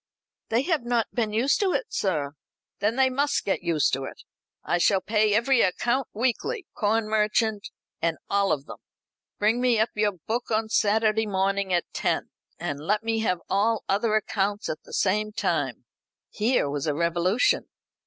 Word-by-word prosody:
"They 230 +3 +2
have 320 -5 0
not 240 -2 0
been 225 -3 0
used 235 +6 +2
to 390 -3 +1
it, - - -2
sir." 150 -8 -1 0.5
"Then 210 +3 +1
they 265 0 +3
must 285 +3 0
get 195 - 0
used 170 -4 +1
to 135 0 -1
it. - - -10 0.4
I 175 - 0
shall 195 +2 +4
pay 210 +1 +2
every 235 +2 +3
account 240 +7 +1
weekly 260 - -1
corn 215 +1 0
merchant, 215 0 +1 0.3
and 165 -1 0
all 200 -1 +1
of 140 -2 -1
them. - - -10 0.6
Bring 220 +4 +2
me 250 -2 +3
up 220 - +2
your 210 -1 +1
book 220 +8 -4
on 220 0 0
Saturday 220 +1 +2
morning 195 0 0
at 175 -1 +2
ten, - - -1 0.3
and 145 -1 -4
let 210 +8 0
me 225 0 0
have 185 -5 0
all 215 +3 +1
other 215 +2 +1
accounts 205 -1 -1
at 155 - -4
the - - -13
same 210 +2 +1
time." - - -1 0.5
Here 225 - +1
was 140 +1 -3
a 150 - 0
revolution. 170 +7 +1
215 Hz, 175 wpm, -26 LUFS, 190-230 Hz, 0.6 s, shall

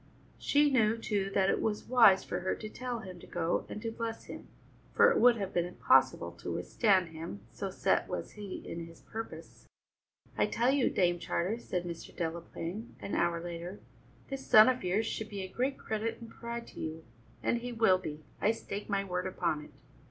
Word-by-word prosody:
She 290 0 +4
knew, 225 -3 +3
too, 205 -3 -1
that 195 -1 +4
it - - 0
was 210 -1 -1
wise 230 -7 +7
for 175 - -3
her 185 +1 -1
to 215 - -7
tell 245 0 -4
him 185 -4 -9
to - - -13
go 170 -1 -1
and - - -5
to 225 - -2
bless 225 0 -4
him, - - -9 0.4
for 485 - +6
it 470 - +2
would 245 -1 +7
have 195 -2 -3
been 175 0 +1
impossible 180 - +3
to - - -4
withstand 190 -6 +2
him, 160 -11 -7
so 120 +11 -4
set - - +1
was - - -4
he 205 -3 -7
in 165 0 -5
his 165 0 -15
purpose. 225 +1 -8 0.7
"I - - +2
tell 240 +3 +2
you, 275 -2 +3
Dame 175 -2 +2
Charter," 190 +7 -1
said 180 -6 -3
Mr. 170 -1 -7
Delaplaine 170 +5 -4
an - - -6
hour 170 -1 +2
later, 175 +3 -6 0.5
"this 270 -1 -4
son 215 +3 +9
of 255 -3 0
yours 190 +5 +1
should 220 -1 -3
be 200 -2 -5
a - - -4
great 255 +8 -1
credit 225 +1 -3
and 230 -1 -10
pride 235 0 -6
to - - -11
you, 160 0 -5 0.4
and 235 - +2
he 245 +1 -5
will 225 -6 +4
be, 155 -3 -6 0.2
I 215 - +4
stake 205 -2 -6
my 200 -1 +1
word 180 -1 -2
upon 155 -4 -1
it." - - -13
200 Hz, 205 wpm, -32 LUFS, 175-230 Hz, 0.7 s, son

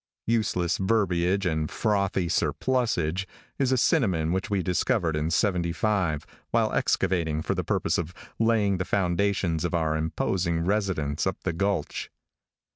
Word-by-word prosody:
"Useless 95 -7 +1
verbiage 95 -2 +1
and 80 -3 0
frothy 100 -4 0
surplusage" 90 - 0 0.3
is 135 -2 +2
a 130 - +3
synonym 95 - +2
which 95 +5 -1
we 100 -3 0
discovered 90 -2 +1
in 75 +1 -1
'75, 85 -2 0 0.2
while - - +1
excavating 85 -5 +1
for - - 0
the - - -2
purpose - - 0
of 85 -1 -3 0.3
laying 110 -4 +2
the 90 - -1
foundations 90 -3 0
of 85 0 -1
our 80 -2 +1
imposing 85 +1 -1
residence 95 -7 0
up 95 - -1
the 90 - -1
gulch. 95 -2 -2
90 Hz, 135 wpm, -26 LUFS, 80-100 Hz, 0.3 s, a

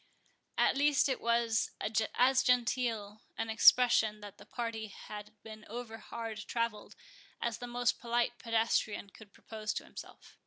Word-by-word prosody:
At - - +3
least 285 0 +3
it 265 - -2
was 235 -1 +1 0.5
as 255 +1 +4
genteel 230 -4 0 0.2
an 225 0 -2
expression 220 -2 +5
that 205 -1 -11
the - - -14
party 230 -2 -4
had 210 +1 -9
been 220 -1 -10
overhard 225 -1 -6
travelled, 230 -3 -3 0.4
as 235 -2 -2
the 245 - -6
most 245 0 0
polite 240 0 0
pedestrian 225 -3 0
could 210 -1 -15
propose 215 -1 -5
to - - -3
himself. - - -12
230 Hz, 140 wpm, -32 LUFS, 215-240 Hz, 0.5 s, expression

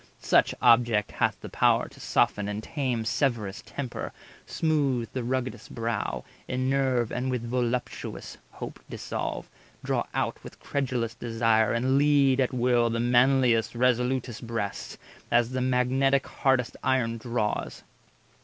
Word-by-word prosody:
Such - - +3
object 115 -3 +4
hath - - 0
the - - -7
power - - +2
to - - -17
soften 105 -1 +1
and 105 +1 -4
tame 125 -6 -2
Severest 110 -5 -1
temper, 130 -4 -5 0.4
smooth 140 -7 0
the 130 - -2
rugged'st 130 +1 -3
brow, 115 0 -2 0.2
Enerve, 130 -2 0
and 125 +2 -2
with 125 -2 -2
voluptuous 120 +1 -3
hope - - -8
dissolve, - - -4 0.4
Draw - - 0
out - - -2
with - - -11
credulous 125 -5 -2
desire, 115 -2 +1
and 130 +3 +2
lead 140 -2 +4
At 130 - +2
will 120 -2 +2
the 115 0 -1
manliest, 120 -1 +3
resolutest 125 -1 0
breast, 110 -4 -4 0.3
As 120 0 +3
the 130 0 -1
magnetic 130 +2 +2
hardest 130 -3 0
iron 115 -3 +1
draws. 115 -2 -2
125 Hz, 130 wpm, -27 LUFS, 115-130 Hz, 0.4 s, object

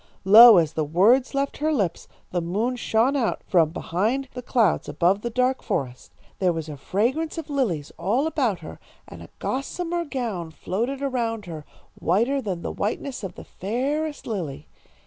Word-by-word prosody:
"Lo, 220 +2 +10
as 160 -3 +2
the 155 - 0
words 210 - +3
left 275 0 -1
her 310 +2 0
lips, 195 - -1 0.2
the 175 - -1
moon 210 +9 -1
shone 240 +3 +1
out 250 -5 -1
from 165 -4 +3
behind 215 +11 -1
the 250 - -6
clouds 235 - +1
above 175 +7 +2
the 235 - -3
dark 255 +2 +1
forest. 125 -2 -4 0.3
There 185 -2 +3
was 165 -2 -4
a 150 - -6
fragrance 250 - -1
of 315 -2 -6
lilies 195 - -1
all 215 - +1
about 270 - 0
her, - - -10 0.3
and - - -11
a - - -11
gossamer 340 +6 -3
gown 230 - -4
floated 235 - -3
around 230 -5 -2
her, 160 -4 -8 0.3
whiter 235 - +1
than 185 -7 -4
the - - -3
whiteness 240 +4 -3
of 185 -3 -6
the - - -10
fairest 285 - -3
lily. 165 - -4
225 Hz, 170 wpm, -24 LUFS, 175-270 Hz, 0.3 s, Lo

